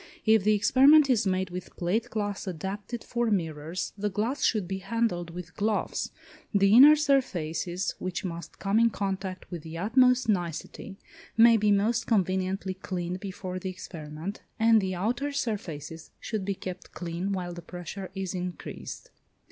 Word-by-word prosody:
If 220 -2 +5
the 215 +1 +4
experiment 270 +7 +6
is 215 -5 +2
made 185 -1 0
with 180 0 -7
plate 185 +6 0
glass 205 -2 -3
adapted 195 +6 -5
for 240 -1 -1
mirrors, 165 -3 -2
the 205 0 -1
glass 220 +8 -2
should 210 -6 +2
be 190 +1 -3
handled 195 -4 -1
with 170 0 -9
gloves. 215 +1 -1 0.5
The 200 0 +5
inner 280 +6 +10
surfaces, 185 - 0
which 185 +1 -3
must 170 -1 -6
come 200 +2 +1
in 230 0 +5
contact 190 -2 -3
with 175 -3 -5
the 160 +1 -8
utmost 250 +5 +3
nicety, 180 0 -2 0.4
may 230 0 +8
be 210 -1 +3
most 220 +4 +2
conveniently 190 -2 0
cleaned 180 -1 -4
before 185 -1 -5
the 190 - -4
experiment, 165 0 -7 0.2
and 225 -1 +5
the 190 -1 -2
outer 245 +10 -1
surfaces 165 - -4
should 215 -4 -3
be 200 0 -1
kept 185 0 -8
clean 175 +3 -3
while 180 -2 -3
the 175 - -8
pressure 180 +2 -7
is 190 -1 -3
increased. 180 -1 -6
195 Hz, 155 wpm, -28 LUFS, 180-220 Hz, 0.5 s, inner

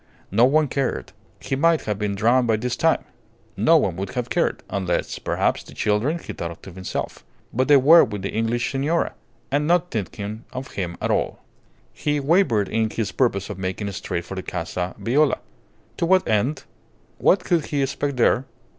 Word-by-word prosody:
No 115 +5 +5
one 150 +3 +3
cared. 130 - -2 0.3
He 135 - -2
might 165 +3 +3
have 105 -2 -3
been 105 -1 -1
drowned 120 +4 +3
by 110 - +3
this 120 +3 -2
time. 165 0 +2 0.5
No 165 +1 +5
one 95 - +1
would 95 0 -5
have 125 -1 -3
cared - - 0
unless, 95 -3 -2
perhaps, - - 0
the - - -14
children, 110 +10 +1
he - - -8
thought 85 -1 -6
to 95 - -9
himself. 95 -8 -5 0.3
But 130 +3 +1
they 145 -1 +7
were 155 +6 +8
with 105 -5 -4
the 100 - -2
English 115 +2 0
signora, 145 +6 0 0.4
and 145 +2 +1
not 175 +1 +2
thinking 105 +1 -4
of 130 +1 -6
him 90 -3 -4
at - - -1
all. - - -1 0.5
He 150 -1 -1
wavered 140 - +3
in 110 +1 0
his 105 -3 -2
purpose 100 -4 0
of 95 - -7
making 95 +2 -3
straight 85 -2 -4
for - - -7
the 95 - -4
Casa 90 +1 -4
Viola. 140 +4 +2 0.6
To 170 - 0
what 185 +1 +4
end? 120 +7 +1 0.6
What 185 0 +4
could 170 -4 +1
he 145 -2 0
expect 140 0 -2
there? 125 +2 +3
120 Hz, 185 wpm, -23 LUFS, 100-145 Hz, 0.6 s, were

